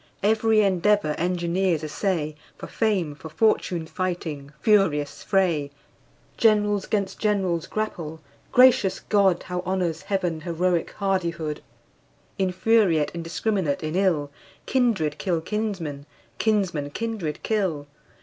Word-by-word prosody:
Every 220 +1 +3
endeavor 195 -3 +2
engineers 175 -1 0
essay, 155 -1 -2 0.2
For - - -7
fame, 195 -9 0
for 155 +2 -10
fortune 175 -1 +1
fighting 160 -5 -4
furious 195 - +2
fray! 175 -8 +1 0.7
Generals 210 -3 +3
'gainst 200 -2 -1
generals 190 -6 0
grapple 165 -7 -4 0.3
gracious 250 -6 +5
God! 195 -4 +2
How 180 0 -4
honors 180 -3 -1
Heaven 180 -5 -2
heroic 170 0 0
hardihood! 170 -6 -2 0.8
Infuriate, 185 -4 +2
indiscrminate 170 -1 -1
in 155 +2 -3
ill, 170 -7 +1 0.3
Kindred 220 - +1
kill 175 -4 0
kinsmen, 165 -7 -4 0.3
kinsmen 190 -10 0
kindred 210 -4 -4
kill. 185 -10 -1
180 Hz, 105 wpm, -24 LUFS, 160-205 Hz, 0.8 s, gracious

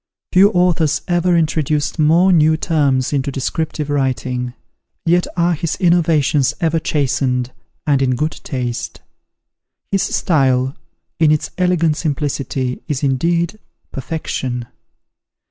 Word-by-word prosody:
Few 195 +2 +6
authors 175 -6 +1
ever 175 0 +2
introduced 155 -1 0
more 170 +5 +4
new 155 -1 +4
terms 140 -5 +1
into 140 0 -1
descriptive 150 +3 -3
writing: 130 -3 -2 0.5
yet 175 +1 +2
are 175 0 +2
his 165 0 -2
innovations 160 -5 +2
ever 165 -1 +1
chastened, 130 -4 0 0.3
and 140 -3 +2
in 130 -1 +2
good 155 +5 -2
taste. 125 -3 -4 0.9
His 195 -1 +2
style, 130 -4 +1 0.4
in 160 -2 +4
its 155 - 0
elegant 170 -4 +2
simplicity, 140 -4 -2
is, 150 -1 -3
indeed, 170 +8 0 0.3
perfection. 130 -4 -4
150 Hz, 110 wpm, -18 LUFS, 135-170 Hz, 0.9 s, Few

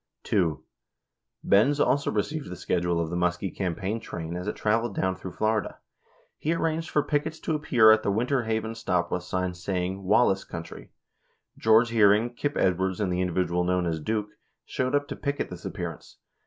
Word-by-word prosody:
6 - - -12
2. 85 -7 +1 0.8
Benz 130 +9 +4
also 145 0 +2
received 145 - -2
the 90 - -6
schedule 85 -1 0
of 80 -1 -2
the - - -2
Muskie 90 +2 -1
campaign 95 +4 -2
train 85 -6 -6
as 90 +2 -5
it - - -2
traveled 110 0 0
down 95 0 0
through 95 0 -8
Florida. 110 -1 -1 0.6
He 160 +2 0
arranged 165 0 -1
for 150 - +2
pickets 155 +2 -1
to 160 - -1
ap 150 -1 -3
pear 110 -3 +6
at 110 0 +5
the - - -1
Winter 125 +6 +1
Haven 110 0 -1
stop 90 -6 -1
with 90 - -1
signs 90 0 -3
saying 95 0 -2
"Wallace 95 0 +3
Country." 85 -1 -9 0.7
George 110 +1 +4
Hearing, 110 +1 +4
Kip 145 +4 -2
Edwards, 95 0 +1
and 95 -4 0
the 90 - 0
individual 90 -1 0
known 90 0 +1
as 80 -2 -1
"Duke" 105 +5 -2 0.4
showed 130 +2 -1
up 145 0 +1
to - - -5
picket 140 -7 -3
this 90 +1 -9
appearance. 90 -4 -6
100 Hz, 185 wpm, -27 LUFS, 90-115 Hz, 0.8 s, pear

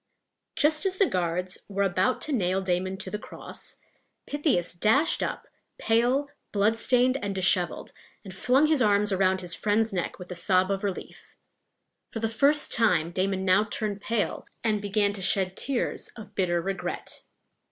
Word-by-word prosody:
Just 305 0 +2
as 380 0 -2
the 395 - +5
guards 180 - -2
were 200 0 0
about 190 +6 +1
to 305 - -2
nail 190 -7 +1
Damon 185 0 -1
to - - -6
the 210 - -3
cross, - - -9 0.5
Pythias 290 - 0
dashed 220 - +2
up, - - -4 0.3
pale, 245 +5 +1 0.2
bloodstained, 235 +5 +3
and 200 -1 -3
disheveled, 180 -1 +1 0.3
and 190 -3 -9
flung 255 +9 +3
his 305 -3 +2
arms 210 -2 +3
around 190 0 +2
his 175 -2 -2
friend's 215 +3 +1
neck 180 -2 -3
with 180 0 -10
a - - -4
sob 185 +2 +2
of 195 0 -2
relief. 195 -2 -6 0.7
For 225 - -5
the 225 - 0
first 285 +6 +3
time 175 -8 +2
Damon 190 +1 -1
now 185 +2 +4
turned 210 -2 -3
pale, 225 0 -2 0.2
and 215 -2 +1
began 205 0 +1
to 200 - -7
shed 190 0 +1
tears 270 +2 -2
of 210 -3 -11
bitter 180 -3 0
regret. 195 +1 -5
200 Hz, 165 wpm, -26 LUFS, 185-230 Hz, 0.7 s, the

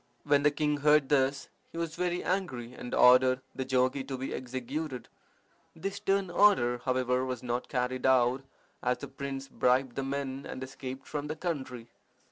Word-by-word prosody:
When 145 -1 +3
the 150 - +5
king 150 0 0
heard 150 -1 +4
this 140 -1 +2 0.2
he - - -9
was 165 -1 -3
very 180 0 -1
angry, 130 -11 -2
and 125 - -8
ordered 130 +1 +6
the 130 - -3
jogi 130 +1 +1
to 135 - -4
be 130 +1 -4
executed. 130 +2 -5 0.7
This 195 +5 -4
stern 195 -2 0
order, 125 -14 +4
however, 130 0 0
was 130 -2 -4
not 120 0 -2
carried 130 0 -1
out, 130 0 +3 0.4
as 125 0 +1
the 140 - -7
prince 135 0 -6
bribed 130 -1 +1
the - - -1
men 135 0 -3
and 130 - -5
escaped 130 0 -7
from 150 -1 -4
the 155 - -3
country. 130 -8 -4
135 Hz, 170 wpm, -30 LUFS, 125-150 Hz, 0.7 s, ordered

